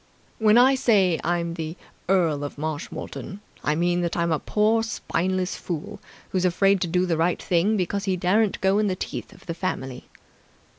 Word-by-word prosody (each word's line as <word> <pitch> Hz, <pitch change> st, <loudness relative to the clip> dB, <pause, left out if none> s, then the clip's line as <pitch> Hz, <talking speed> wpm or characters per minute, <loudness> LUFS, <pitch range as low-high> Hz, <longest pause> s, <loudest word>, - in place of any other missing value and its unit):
When 215 Hz, 0 st, +5 dB
I 255 Hz, +2 st, +6 dB
say 200 Hz, -10 st, +3 dB
'I'm 170 Hz, 0 st, -1 dB
the 165 Hz, 0 st, -5 dB, 0.3 s
Earl 165 Hz, -7 st, +2 dB
of 145 Hz, -, -6 dB
Marshmoreton', 155 Hz, +5 st, -5 dB, 0.2 s
I 150 Hz, -, +1 dB
mean 175 Hz, +2 st, +1 dB
that 170 Hz, 0 st, -2 dB
I'm 170 Hz, 0 st, +1 dB
a 155 Hz, -, +1 dB
poor 215 Hz, +2 st, +2 dB
spineless 185 Hz, -4 st, -1 dB
fool 180 Hz, +5 st, -5 dB, 0.3 s
who's 185 Hz, -1 st, 0 dB
afraid 195 Hz, +2 st, +3 dB
to 180 Hz, -, 0 dB
do 180 Hz, +2 st, +1 dB
the 170 Hz, -3 st, 0 dB
right 170 Hz, +2 st, +1 dB
thing 185 Hz, +5 st, +1 dB
because 195 Hz, +2 st, -1 dB
he 190 Hz, -2 st, 0 dB
daren't 195 Hz, +4 st, +2 dB
go 190 Hz, +2 st, +3 dB
in 215 Hz, -, +2 dB
the 185 Hz, -, 0 dB
teeth -, -, -6 dB
of -, -, -17 dB
the 170 Hz, -, -3 dB
family." 135 Hz, -8 st, -4 dB
180 Hz, 185 wpm, -24 LUFS, 170-200 Hz, 0.3 s, I